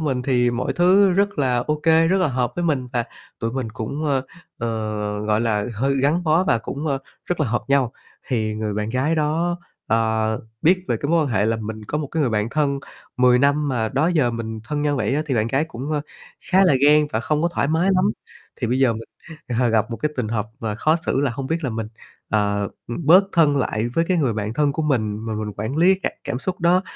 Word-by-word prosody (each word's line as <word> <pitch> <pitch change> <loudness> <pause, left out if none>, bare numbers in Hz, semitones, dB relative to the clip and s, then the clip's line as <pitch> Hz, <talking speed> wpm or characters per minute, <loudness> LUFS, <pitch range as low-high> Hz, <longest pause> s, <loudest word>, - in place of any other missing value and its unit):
mình 135 -5 -1
thì 125 -2 +2
mọi 120 +1 -2
thứ 190 +3 +4
rất 200 +2 +1
là 130 -3 +2
ô 150 +5 -1
kê, 165 0 +4
rất 190 - +3
là 185 - +2
hợp 125 -2 -1
với 175 - -1
mình 135 -6 0
và 120 -1 0 0.4
tụi 115 0 -2
mình 130 -4 -3
cũng, 115 +7 -4
ơ, 140 -3 +1 0.4
ờ, 110 -3 -3
gọi 105 0 +1
là, 105 -3 0
hơi 135 +6 0
gắn 145 +6 +2
bó 160 +3 +3
và 115 - +2
cũng, 140 +6 -5
ơ, 140 -3 0 0.3
rất 175 - -2
là - - +2
hợp 120 +2 -1
nhau, 135 -3 +2 0.4
thì 110 -4 -1
người 105 -1 -3
bạn 105 +1 -2
gái 130 +6 +1
đó, 165 +3 0 0.3
ờ, 110 -1 +1 0.2
biết 185 +3 +3
về - - +1
cái 145 - -2
mối 170 0 +4
quan - - -2
hệ 105 -4 +1
là 115 0 +1
mình 110 0 -6
có 150 - -2
một 150 - -3
cái 160 - 0
người 135 -5 +2
bạn 105 0 0
thân 140 -2 0 0.4
10 125 0 +5
năm 145 +2 +2
mà 115 -4 0
đó 135 +7 +1
giờ 155 -9 +2
mình 110 -1 -5
thân 145 +4 -2
nhau 145 -1 +1
vậy 110 0 0
á, 150 - +1
thì 135 - -1
bạn 110 -2 +1
gái 135 +6 +1
cũng, 140 -1 -6
ơ, 150 - 0 0.5
khá 190 +1 +5
là 180 - +4
ghen 150 +1 +5
và 110 - 0
không 150 +5 0
có 170 - +3
thoải 140 - +1
mái 165 +5 +2
lắm. 185 0 +3 0.6
Thì 120 - 0
bây 125 +3 0
giờ 130 -3 +4
mình, 115 0 -6 0.6
ờ, 125 - +3
gặp 110 0 +1
một 115 - -3
cái 150 - -1
tình 120 -4 -1
hợp 110 -1 -1
mà 110 -2 -2
khó 155 +9 +2
xử 135 - +1
là 140 -2 +1
hông 135 0 -4
biết 165 +2 -2
là 130 - -1
mình, 110 -1 -4 0.4
ờ, 100 -1 +1 0.2
ừm, 140 +6 -5
bớt 180 +5 +7
thân 155 -4 +4
lại 115 -4 0
với 165 +8 0
cái 185 - +2
người 140 -8 +1
bạn 110 0 -3
thân 145 0 +2
của 160 - -2
mình 110 -8 0
mà 110 - -2
mình 105 -1 -4
quản 110 +7 -3
lý 180 +4 +5
cả - - 0
cảm 125 - -3
xúc 180 +7 -3
đó, 175 +2 +3
130 Hz, 250 wpm, -22 LUFS, 110-155 Hz, 0.6 s, bớt